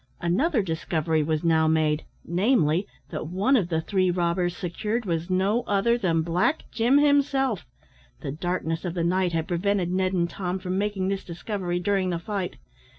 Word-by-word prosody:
Another 220 - +1
discovery 160 -2 0
was 155 +1 -1
now 160 -1 +3
made, 155 -1 +1 0.2
namely, 180 - +2 0.2
that 155 -2 -4
one 195 - +2
of 195 -9 +1
the 160 -2 0
three 185 +2 +1
robbers 175 0 0
secured 210 +6 -2
was 170 -1 -2
no 195 +5 +2
other 205 +4 +2
than 170 -8 +1
Black 175 - +1
Jim 240 +4 +3
himself; 280 -6 +2 0.5
the - - -4
darkness 165 +1 -2
of 175 -2 -3
the 170 - 0
night 180 +1 +1
had 165 -1 -1
prevented 180 0 0
Ned 185 0 +1
and 170 -2 +1
Tom 180 +1 -3
from 185 -1 -3
making 200 -1 -1
this 195 0 -2
discovery 175 0 -3
during 190 0 +1
the 175 - -1
fight. 190 +1 -4
180 Hz, 170 wpm, -25 LUFS, 170-205 Hz, 0.5 s, now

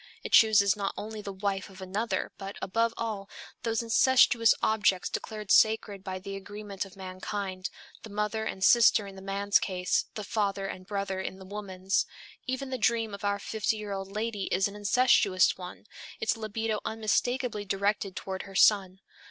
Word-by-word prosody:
It - - -5
chooses 205 -3 +6
not 200 -1 -3
only 215 0 -6
the 200 - -6
wife 195 0 -3
of 190 0 -14
another, 195 +5 -2
but, 195 0 -7
above 230 +4 +1
all, 210 -4 -4 0.3
those 230 0 -1
incestuous 230 -1 +5
objects 210 -4 +2
declared 215 -2 -4
sacred 215 -3 +3
by 190 -1 -4
the 195 +1 -7
agreement 200 0 -6
of 195 - -14
mankind 185 0 -5 0.3
the 220 - -10
mother 210 +1 -2
and 190 -3 -4
sister 225 -2 +6
in 195 -1 -10
the 190 - -10
man's 200 +1 +2
case, 180 -1 0
the 215 - -4
father 200 -2 -1
and 185 -1 -7
brother 195 -2 -2
in 190 - -5
the 190 - -12
woman's. 190 -1 -2 0.4
Even 260 +1 -3
the 260 - -2
dream 225 -1 +1
of 200 - -8
our 200 0 +1
fifty 220 +2 -1
year 210 -1 -6
old 195 0 -5
lady 210 -1 -2
is 190 +2 +1
an 200 - -9
incestuous 205 -3 +3
one, 180 +2 -9 0.3
its 220 - +1
libido 220 0 -2
unmistakably 225 +1 -1
directed 200 0 -1
toward 190 0 -4
her 195 - -11
son. 195 -1 +4
200 Hz, 175 wpm, -29 LUFS, 195-220 Hz, 0.4 s, chooses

